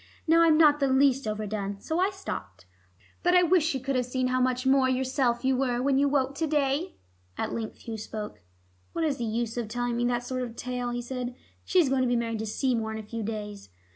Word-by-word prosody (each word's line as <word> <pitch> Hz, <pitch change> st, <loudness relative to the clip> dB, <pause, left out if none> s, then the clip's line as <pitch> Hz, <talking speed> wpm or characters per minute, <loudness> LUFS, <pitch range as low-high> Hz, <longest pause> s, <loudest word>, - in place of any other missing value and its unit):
Now 330 Hz, +1 st, +5 dB
I'm 325 Hz, -2 st, +5 dB
not 300 Hz, -2 st, +6 dB
the 275 Hz, -, +2 dB
least 265 Hz, -1 st, +3 dB
overdone. 210 Hz, -2 st, -3 dB
So 320 Hz, -, -2 dB
I 375 Hz, +2 st, +3 dB
stopped. 95 Hz, -, -7 dB, 0.6 s
But 355 Hz, +1 st, +3 dB
I 360 Hz, -, +6 dB
wish 350 Hz, -1 st, +4 dB
she 300 Hz, -4 st, 0 dB
could 270 Hz, +1 st, -2 dB
have 250 Hz, -1 st, 0 dB
seen 255 Hz, 0 st, 0 dB
how 255 Hz, 0 st, +1 dB
much 255 Hz, 0 st, 0 dB
more 265 Hz, -1 st, +4 dB
yourself 260 Hz, -1 st, 0 dB
you 265 Hz, 0 st, +3 dB
were 250 Hz, -2 st, 0 dB
when 270 Hz, +1 st, +2 dB
you 285 Hz, 0 st, +3 dB
woke 275 Hz, -1 st, +1 dB
to 320 Hz, -, +1 dB
day." 295 Hz, +4 st, 0 dB, 0.4 s
At -, -, -2 dB
length 225 Hz, -2 st, -5 dB
Hugh 225 Hz, -2 st, -6 dB
spoke. 210 Hz, -, -6 dB, 0.5 s
"What 330 Hz, -, 0 dB
is 290 Hz, -3 st, 0 dB
the 235 Hz, -, -2 dB
use 230 Hz, +1 st, -2 dB
of 235 Hz, -2 st, -2 dB
telling 245 Hz, +2 st, -2 dB
me 240 Hz, 0 st, 0 dB
that 240 Hz, 0 st, 0 dB
sort 255 Hz, +1 st, -3 dB
of 235 Hz, -2 st, -5 dB
tale?" 250 Hz, 0 st, -3 dB
he 240 Hz, 0 st, -3 dB
said. 250 Hz, 0 st, -4 dB, 0.3 s
"She 375 Hz, -, 0 dB
is 310 Hz, -6 st, +4 dB
going 265 Hz, -1 st, +2 dB
to 255 Hz, -, +2 dB
be 245 Hz, -, +2 dB
married 230 Hz, -2 st, -1 dB
to 220 Hz, -, -3 dB
Seymour 225 Hz, -1 st, 0 dB
in -, -, -4 dB
a 220 Hz, -, -6 dB
few 225 Hz, +2 st, -5 dB
days. 210 Hz, -, -5 dB
255 Hz, 240 wpm, -27 LUFS, 230-275 Hz, 0.6 s, not